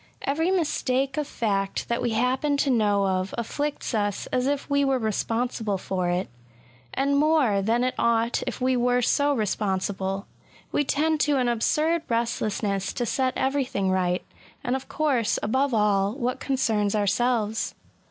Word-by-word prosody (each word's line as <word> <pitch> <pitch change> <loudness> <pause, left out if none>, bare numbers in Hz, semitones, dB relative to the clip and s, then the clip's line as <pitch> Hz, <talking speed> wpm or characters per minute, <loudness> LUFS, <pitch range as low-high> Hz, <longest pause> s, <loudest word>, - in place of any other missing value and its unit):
Bvery 320 +5 +1
mistake 275 -6 0
of 300 -2 -2
fact 195 -3 -1
diat 235 - -1
we 245 - 0
happen 255 +5 +1
to 280 -1 +2
know 205 -4 +2
of 185 0 -1
afficts 285 +5 -3
us 205 -3 -1
as 250 +1 +1
if 285 0 -1
we 280 0 +2
were 270 -1 +2
responsible 225 -1 -1
for 185 -1 -2
it, 180 +2 0 0.4
— - - -29 0.3
and 280 +1 +1
more 290 -10 +3
than 230 +5 +1
it 255 - 0
ought 230 0 +2
if 250 - -3
we 255 0 +2
were 245 0 +2
so 285 +4 +2
responsible. 195 -4 -1 0.5
We 290 - +2
tend 310 +3 +1
to 295 -2 +2
an 250 -2 +1
absurd 305 +8 +1
restlessness 215 -4 -1
to 245 - -2
set 260 +2 0
everything 265 -8 0
right; 180 -1 0 0.4
and 250 +1 0
of 265 - -6
course, 270 -8 +1
above 265 +6 +1
all, 205 -2 +2
what 255 0 -2
concerns 220 -6 0
ourselves. 220 +1 0
240 Hz, 160 wpm, -25 LUFS, 205-270 Hz, 0.5 s, more